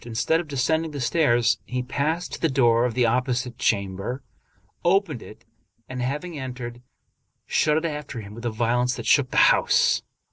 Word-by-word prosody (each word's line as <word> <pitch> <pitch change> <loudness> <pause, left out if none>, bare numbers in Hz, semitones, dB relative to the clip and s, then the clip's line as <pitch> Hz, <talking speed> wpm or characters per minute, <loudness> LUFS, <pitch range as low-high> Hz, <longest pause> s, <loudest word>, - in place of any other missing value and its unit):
Instead 120 +8 0
of 170 - -5
descending 160 +4 0
the 145 -2 -6
stairs, 120 -6 +2
he 125 0 -3
passed 155 +7 -2
to - - -6
the 165 - +2
door 120 -3 +3
of 120 -3 -2
the 125 -1 +3
opposite 125 +1 -1
chamber, 100 +5 -1 0.6
opened 175 - +1
it, - - -13 0.4
and, 130 -1 -5
having 150 +5 -3
entered, 125 -2 -6 0.6
shut 150 0 +2
it 160 - -1
after 150 -6 -4
him 100 -1 -9
with 115 +2 -10
a 120 - 0
vio 115 +2 0
lence 125 0 +1
that - - -7
shook 140 -3 +3
the - - -3 0.2
house. - - +2
125 Hz, 180 wpm, -24 LUFS, 120-150 Hz, 0.6 s, door